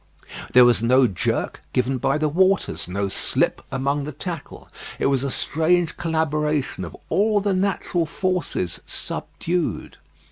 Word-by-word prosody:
There 125 0 +8
was 120 -3 +4
no 130 +3 +5
jerk 95 -7 -2
given 130 +1 +1
by 135 +4 +1
the 155 0 +1
waters, 185 - +1
no 100 +2 -2
slip - - +1
among 140 +2 0
the 150 - -5
tackle. 165 +1 -7 0.3
It - - -1
was 135 -1 +2
a 140 - -1
strange 160 +5 +1
collaboration 150 - -1
of 85 -2 -8
all 210 +1 +3
the 200 -1 0
natural 185 -3 0
forces 180 - -2
subdued. 175 -1 -3
150 Hz, 140 wpm, -23 LUFS, 130-175 Hz, 0.3 s, There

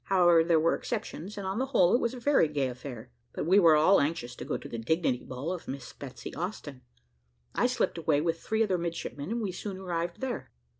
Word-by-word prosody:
However, 175 -3 +5
there 165 -1 +3
were 165 +2 +3
exceptions, 210 -4 -4
and 200 - -4
on 190 +4 -2
the 265 - 0
whole 185 -10 +4
it 240 - +5
was 235 +2 -1
a - - -7
very 265 - +4
gay 145 -3 0
affair; 125 -1 -8 0.2
but - - -3
we 190 +5 +6
were 165 -5 +7
all 160 +6 +5
anxious 140 -5 -2
to - - -6
go - - -2
to - - -9
the 115 - -5
dignity 130 0 0
ball 130 +6 -5
of 180 - -8
Miss 135 -1 -6
Betsy 130 -5 -8
Austin. 155 -6 -5 0.7
I - - +2
slipped - - 0
away 145 - +2
with 165 +1 0
three 220 +1 +1
other 190 -4 0
midshipmen, 165 -3 -4
and 235 +1 -1
we 195 - -1
soon 190 +1 -6
arrived 175 -2 -3
there. 260 -2 -4
170 Hz, 230 wpm, -29 LUFS, 145-195 Hz, 0.7 s, were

